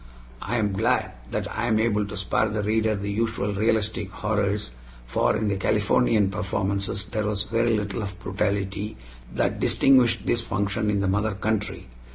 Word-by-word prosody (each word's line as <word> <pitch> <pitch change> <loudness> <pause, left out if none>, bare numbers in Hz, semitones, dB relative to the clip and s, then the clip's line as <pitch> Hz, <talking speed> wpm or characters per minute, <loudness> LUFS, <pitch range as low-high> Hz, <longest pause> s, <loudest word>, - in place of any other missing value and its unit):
I 120 - -2
am 105 -3 +1
glad 95 - +1 0.2
that - - -2
I 115 +2 0
am 110 -2 +3
able 105 -2 +1
to 100 - -7
spare 100 +3 +1
the 105 -1 -2
reader 110 +1 +1
the 100 0 -3
usual 110 -1 -1
realistic 110 -1 0
horrors, 105 - -1 0.3
for - - +1
in 110 - -1
the 100 -1 0
Californian 105 0 +2
performances 100 0 -2
there 110 -2 -2
was 105 -1 -1
very 115 +1 +1
little 105 +2 -3
of 100 -2 -5
the - - -18
brutality 100 +2 -2 0.4
that - - 0
distinguished 130 -4 +4
this 120 - +1
function 100 0 -1
in 100 -1 +1
the 100 - +1
mother 105 +2 +1
country. 105 +1 -2
105 Hz, 175 wpm, -25 LUFS, 100-110 Hz, 0.4 s, distinguished